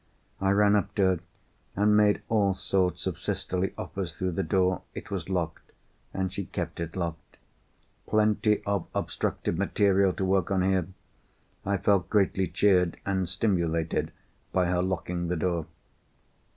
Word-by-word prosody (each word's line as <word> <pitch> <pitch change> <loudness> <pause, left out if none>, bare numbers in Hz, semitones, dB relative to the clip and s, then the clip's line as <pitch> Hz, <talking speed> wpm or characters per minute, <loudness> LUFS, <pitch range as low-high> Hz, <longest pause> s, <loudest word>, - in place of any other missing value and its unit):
I 95 - +1
ran 100 +1 +4
up 105 - 0
to 100 - +2
her 95 -2 +3 0.6
and 105 +1 +4
made 105 -1 +4
all 100 -4 +2
sorts 95 -2 0
of - - -3
sisterly 90 +1 -2
offers 90 -4 -5
through 95 -1 -1
the 90 - -1
door. 90 +1 +1
It - - -8
was 95 -3 -4
locked, 85 -3 -3 0.4
and 95 -1 -2
she 100 0 -3
kept - - -5
it 85 0 -4
locked. 85 -3 -5 0.7
Plenty 105 0 +2
of 100 -3 -1
obstructive 85 - -2
material 100 -1 +3
to 95 - -2
work 95 -2 +2
on 95 -2 +2
here! 95 -3 +1 0.8
I 100 0 +2
felt 95 -3 +2
greatly 95 -2 +2
cheered 90 -4 +3
and 95 -3 0
stimulated 85 -7 0 0.4
by 90 -1 +2
her 90 0 +1
locking 90 -1 -2
the 90 +1 -1
door. 85 -2 -1
95 Hz, 150 wpm, -28 LUFS, 90-100 Hz, 0.8 s, ran